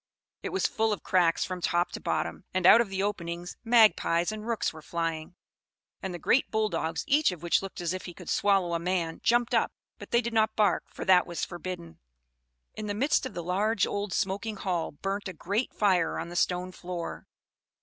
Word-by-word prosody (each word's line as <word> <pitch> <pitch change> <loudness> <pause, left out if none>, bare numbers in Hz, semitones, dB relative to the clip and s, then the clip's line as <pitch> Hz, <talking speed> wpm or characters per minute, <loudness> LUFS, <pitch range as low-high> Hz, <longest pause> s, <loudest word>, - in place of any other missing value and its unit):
It - - -4
was 385 - -1
full 220 0 +1
of 210 - -3
cracks 175 -3 +2
from 185 -1 -5
top 175 +1 +1
to - - -5
bottom; 80 -1 -2
and 185 -1 +1
out 230 +5 +9
of 230 - -2
the 195 0 -2
openings 175 -3 -4
magpies 215 -7 +4
and 215 +1 -7
rooks 230 -7 -1
were 155 - -11
flying; 165 0 -3 0.7
and 190 - -4
the 175 - -5
great 245 - +2
bull 220 -1 +1
dogs, 165 -2 -2
each 295 -4 +3
of 175 -2 -9
which 170 - +2
looked 195 -1 -7
as 170 0 -1
if 185 - -5
he 175 - -7
could 180 - -12
swallow 195 -4 +2
a 170 - 0
man, 170 -2 -2
jumped 240 0 +2
up, - - +2 0.3
but - - -10
they 235 - +3
did 235 -1 -4
not 220 -1 +2
bark, 205 -5 +2
for - - -8
that 185 -2 +5
was 170 -1 -3
forbidden. 175 - -7 0.7
In 215 - -6
the 205 - -2
midst 275 +4 +1
of - - -12
the 175 - -4
large, 200 +4 +1
old, 205 -1 -3
smoking 200 +4 -1
hall 180 -4 -2
burnt 195 +7 -4
a 185 - -5
great 205 +8 -2
fire 185 -5 +2
on - - -4
the 175 - -8
stone 180 +1 0
floor. 180 -2 -6
185 Hz, 210 wpm, -28 LUFS, 170-215 Hz, 0.7 s, out